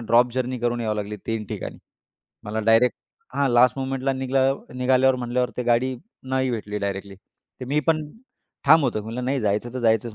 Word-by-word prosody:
Drop 120 +1 +4
journey 130 0 -2
करून 120 0 -1
याव 110 -2 -1
लागली 105 0 -4
3 115 -1 -2
ठिकाणी. - - -6 0.7
मला 110 +2 -2
डायरेक्ट 115 +2 +4 0.4
हां, 140 -1 +2
लास्ट 125 +2 +4
मोमेंटला 135 0 -1
निघला 130 0 +1 0.3
निघाल्यावर 130 +1 +3
म्हटल्यावर 125 0 -1
ते 125 - -1
गाडी 120 +2 +1 0.3
नाही 130 0 +1
भेटली 105 -3 -3
डायरेक्टली. 100 0 -4 0.5
तर - - -4
मी 150 +2 +2
पण 155 -2 +2 0.6
ठाम 160 +2 +7
होतो, 110 -4 -1
म्हटलं 115 +4 -5
नाही 135 +1 0
जायचं 110 +3 -1
तर 130 - -2
जायचंच 115 -1 +1
125 Hz, 180 wpm, -24 LUFS, 115-130 Hz, 0.7 s, ठाम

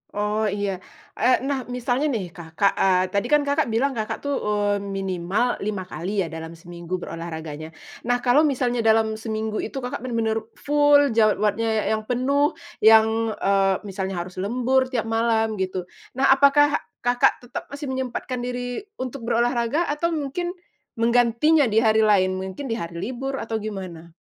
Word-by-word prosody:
Oh 210 +1 0
iya. 200 -2 -2 0.4
Eee, 255 +1 +3
nah 270 -2 -2
misalnya 250 +3 -1
nih 200 - -2
Kakak 170 +2 0
eee, 185 -1 +4
tadi 200 0 0
kan 295 -1 +3
Kakak 285 +1 +1
bilang 235 +5 +1
Kakak 220 0 -4
tuh, 285 -1 -1
eee, 205 -1 0
minimal 195 +3 -1
5 200 -2 -3
kali 185 +3 -3
ya - - -4
dalam 160 +1 -7
seminggu 175 +1 -7
berolahraganya. 160 -2 -7 0.3
Nah 245 0 +1
kalau 285 +5 +4
misalnya 245 -3 0
dalam 220 -1 +2
seminggu 220 -1 -3
itu, - - -5
Kakak 250 - -4
bener-bener 230 -3 -1 0.2
full 290 -2 +4
jadwalnya 215 0 +2
yang 215 0 -2
penuh, 280 +5 +1 0.2
yang, 220 0 +5
eee, 195 -1 +2
misalnya 195 -1 -4
harus 185 +1 -10
lembur 255 +6 +1
tiap 250 -4 -1
malam 225 -2 0
gitu. 185 -1 -2 0.3
Nah, 270 +1 +4
apakah 290 +2 +5 0.2
Kakak 245 0 +2
tetap 245 - -6
masih 285 -1 -6
menyempatkan 255 -1 -3
diri 245 0 -3 0.2
untuk 255 -2 -6
berolahraga 240 +6 +1
atau 300 +3 0
mungkin 345 +5 -3 0.4
menggantinya 245 +6 +3
di 220 +1 +2
hari 220 0 +4
lain? 185 -3 +3
Mungkin 190 +7 -6
di 225 - -1
hari 170 -2 -6 0.2
libur 270 +2 -4
atau 225 -1 -3
gimana? 185 -6 -7
225 Hz, 155 wpm, -23 LUFS, 195-255 Hz, 0.4 s, yang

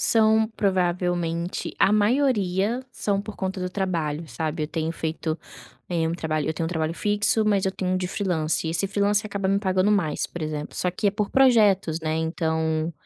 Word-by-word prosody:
São 220 -1 +4
provavelmente 175 -3 -1
a 195 - +4
maioria 215 -2 +2
são 200 -1 -1
por 210 0 -8
conta 190 0 -3
do 180 0 -3
trabalho, 170 -5 -2
sabe, 155 0 -3
eu - - -6
tenho 160 0 -2
feito, 160 0 -3 0.5
eh, 165 -2 0
um - - -1
trabalho 155 -3 -2
eu 160 - -1
tenho 165 - -2
um - - -2
trabalho 160 -2 -1
fixo, 210 +3 +1
mas 205 -2 +2
eu 190 - +1
tenho 185 -1 -2
um - - +2
de 185 -1 -2
freelancer 170 -6 -1
e - - -1
esse 170 +4 0
freelancer 205 +1 +1
acaba 200 -1 -2
me 195 +1 +3
pagando 190 0 +2
mais, 170 -7 0
por 175 - -7
exemplo, 150 -1 -4
só 180 - +1
que 185 +3 -2
é 200 - +5
por 210 -1 -2
projetos, 210 -11 +4
né, 155 0 -1
então, 160 0 -1
180 Hz, 200 wpm, -24 LUFS, 160-205 Hz, 0.5 s, é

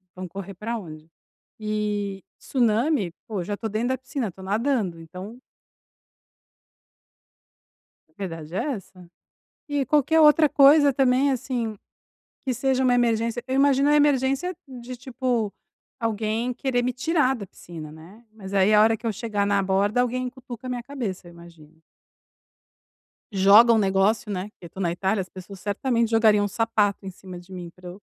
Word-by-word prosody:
vamos 185 -1 -7
correr 195 0 -7
para 225 +5 -4
onde? 155 -5 -10 0.5
E, 210 -2 -3
tsunami, 235 - +1 0.2
pô, 205 -5 -3
já 205 - -3
estou 220 +2 -5
dentro 220 +4 -1
da 260 - 0
piscina, 260 -2 -4
estou 190 +1 -11
nadando, 210 -4 -1
então 185 +9 -10 2.7
a - - -33
verdade 165 -4 -6
é - - 0
essa. 185 -4 -11 0.6
E 290 -2 0
qualquer 305 +2 +3
outra 305 0 +6
coisa, 285 +1 +6
também, 265 +1 +3
assim, 245 -4 -3 0.7
que 260 - 0
seja 265 +2 +1
uma 250 -1 +4
emergência, 235 0 +1
eu 260 - -1
imagino 275 +1 +4
a 295 - +5
emergência 290 +4 +2
de, 250 -1 -8
tipo, 245 -4 -2 0.5
alguém 225 +1 -1
querer 245 -1 -1
me 250 +1 -1
tirar 270 0 +1
da 210 -5 -7
piscina, 160 -4 -10
né. 170 +9 -14
Mas 200 -3 -9
aí, 195 +2 +4
a 210 - +7
hora 225 +1 +4
que 230 - -13
eu 220 - 0
chegar 210 -3 -2
na 200 -1 +2
borda, 200 +5 +2
alguém 250 +1 -1
cutuca 255 -1 -10
a - - -4
minha 245 -1 -4
cabeça, 230 -10 -5
eu - - -12
imagino. 165 -2 -16 1.5
Joga 205 +4 +7
um - - +4
negócio, 200 +2 +1
né. 185 -2 -2
Porque 195 - -16
eu - - -10
tô 190 - -12
na 175 -3 0
Itália, 190 +4 0
as 185 - -8
pessoas 190 +1 -11
certamente 230 +3 0
jogariam 220 -2 +4
um - - 0
sapato 210 -2 0
em 190 - -5
cima 185 0 -11
de 180 +2 -17
mim 180 -2 -7
para 180 -1 -10
eu 180 +3 -11
220 Hz, 170 wpm, -24 LUFS, 190-255 Hz, 2.7 s, a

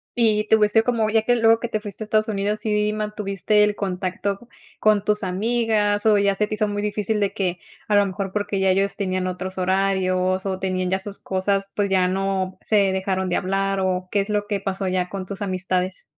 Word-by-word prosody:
Y 215 -3 +2
te 220 - +5
hubiese 215 +1 +3
como, 225 -3 +1
ya 220 0 +2
que 245 +2 +3
luego 225 -1 +4
que 235 - -3
te 215 - -1
fuiste 210 0 -7
a - - -6
Estados 215 0 +1
Unidos, 210 0 -1
¿sí 210 -1 0
mantuviste 210 -1 0
el 210 0 +1
contacto 195 +3 -3 0.3
con 210 -2 +3
tus 210 0 0
amigas 210 +1 +1
o 215 -2 +5
ya 200 -1 +2
se 210 - +1
te 210 - -6
hizo 215 0 0
muy 205 0 -3
difícil 210 +1 -1
de 200 -1 0
que, 180 -3 -2 0.3
a 210 - +2
lo 205 0 +5
mejor, 195 0 -4
porque 205 -1 -2
ya 190 - +2
ellos 195 +1 +1
tenían 185 -2 -2
otros 185 +1 -5
horarios 185 0 +1
o 190 -1 -2
tenían 185 -1 -1
ya 190 - +1
sus 200 +1 -8
cosas, 195 +1 -1
pues 205 -1 0
ya 185 -1 +3
no 190 0 -2
se 200 -3 +2
dejaron 190 0 -1
de 175 - 0
hablar 195 +1 0
o 185 -1 -1
qué 205 - +2
es 200 +1 -2
lo 210 -1 0
que 205 -1 -2
pasó 195 0 -3
ya 185 -1 -1
con 195 -1 -5
tus 200 +2 -7
amistades? 185 -1 -2
200 Hz, 225 wpm, -22 LUFS, 190-210 Hz, 0.3 s, te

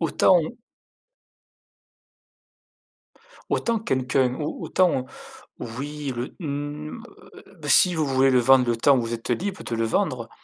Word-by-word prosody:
autant 165 -3 +1
on 170 +8 -2 2.9
autant 230 -1 0
quelqu'un 130 - 0
ou 150 - -4
autant 170 -9 +1 0.5
oui 140 +4 -5
le 120 +2 -5
mmh, 150 +6 -5
heu, - - -14
si 180 -3 +5
vous 155 -2 0
voulez 135 0 +3
le 125 - +4
vendre 125 0 +4
le 120 -1 0
temps 140 +3 +4
où - - 0
vous 115 0 -4
êtes 115 +2 -6
libre 185 +10 -2
de 115 - -4
le 115 - -1
vendre. 125 - -1
135 Hz, 140 wpm, -24 LUFS, 125-155 Hz, 2.9 s, si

